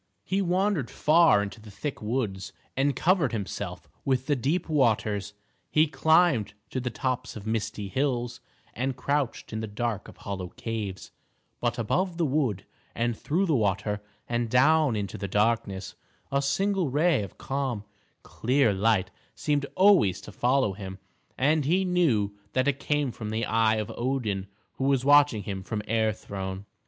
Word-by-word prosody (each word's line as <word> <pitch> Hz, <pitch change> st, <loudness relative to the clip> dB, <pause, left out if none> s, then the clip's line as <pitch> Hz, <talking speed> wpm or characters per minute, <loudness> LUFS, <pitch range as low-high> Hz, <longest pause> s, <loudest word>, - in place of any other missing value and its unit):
He 195 Hz, +1 st, 0 dB
wandered 185 Hz, -, +1 dB
far 160 Hz, -8 st, +4 dB
into 105 Hz, +2 st, -7 dB
the 105 Hz, -, -12 dB
thick 125 Hz, +9 st, -5 dB
woods, 105 Hz, -4 st, -2 dB, 0.2 s
and 135 Hz, +1 st, +1 dB
covered 170 Hz, -5 st, +2 dB
himself 105 Hz, -4 st, -4 dB, 0.2 s
with 130 Hz, -1 st, +1 dB
the 145 Hz, -, +2 dB
deep 145 Hz, +8 st, 0 dB
waters; 110 Hz, -8 st, +1 dB, 0.4 s
he 155 Hz, +1 st, +4 dB
climbed 160 Hz, -, +3 dB, 0.2 s
to 130 Hz, -, -1 dB
the 125 Hz, 0 st, -2 dB
tops 125 Hz, +1 st, -3 dB
of 105 Hz, -2 st, -8 dB
misty 110 Hz, -2 st, -2 dB
hills, 120 Hz, +1 st, -1 dB, 0.3 s
and 130 Hz, +1 st, -2 dB
crouched 140 Hz, -3 st, -1 dB
in 110 Hz, -, -2 dB
the 110 Hz, -, -3 dB
dark 105 Hz, 0 st, -3 dB
of -, -, -13 dB
hollow 95 Hz, -2 st, -5 dB
caves; 105 Hz, -5 st, -4 dB, 0.5 s
but 120 Hz, 0 st, -1 dB
above 170 Hz, -, 0 dB
the 170 Hz, -, +2 dB
wood, 130 Hz, -9 st, 0 dB, 0.3 s
and 120 Hz, 0 st, 0 dB
through 170 Hz, -, 0 dB
the 165 Hz, -, +1 dB
water, 105 Hz, -1 st, 0 dB, 0.3 s
and 120 Hz, -1 st, -1 dB
down 140 Hz, +2 st, +4 dB
into 100 Hz, -2 st, -4 dB
the 100 Hz, -, -3 dB
darkness, 105 Hz, -2 st, 0 dB, 0.4 s
a 140 Hz, 0 st, +2 dB
single 185 Hz, +4 st, +1 dB
ray 150 Hz, 0 st, +3 dB
of 100 Hz, -, -8 dB
calm, 135 Hz, -6 st, -2 dB, 0.4 s
clear 125 Hz, -2 st, +2 dB
light 105 Hz, 0 st, +2 dB, 0.2 s
seemed 145 Hz, -2 st, 0 dB
always 185 Hz, -, +5 dB
to -, -, -10 dB
follow 125 Hz, -4 st, +2 dB
him, 95 Hz, -1 st, -7 dB, 0.4 s
and 150 Hz, +2 st, +2 dB
he 185 Hz, +6 st, +2 dB
knew 130 Hz, -, +2 dB, 0.2 s
that 130 Hz, +1 st, +2 dB
it 140 Hz, -1 st, +1 dB
came 145 Hz, -2 st, 0 dB
from 110 Hz, -2 st, -6 dB
the 110 Hz, +1 st, -1 dB
eye 110 Hz, 0 st, +3 dB
of 110 Hz, +1 st, -3 dB
Odin 115 Hz, -7 st, -1 dB, 0.3 s
who 135 Hz, -, -1 dB
was 135 Hz, -2 st, +2 dB
watching 145 Hz, -7 st, +5 dB
him 95 Hz, 0 st, -4 dB
from 105 Hz, +2 st, -4 dB
Air 110 Hz, 0 st, +2 dB
Throne. 95 Hz, -2 st, -6 dB
120 Hz, 165 wpm, -27 LUFS, 105-145 Hz, 0.5 s, always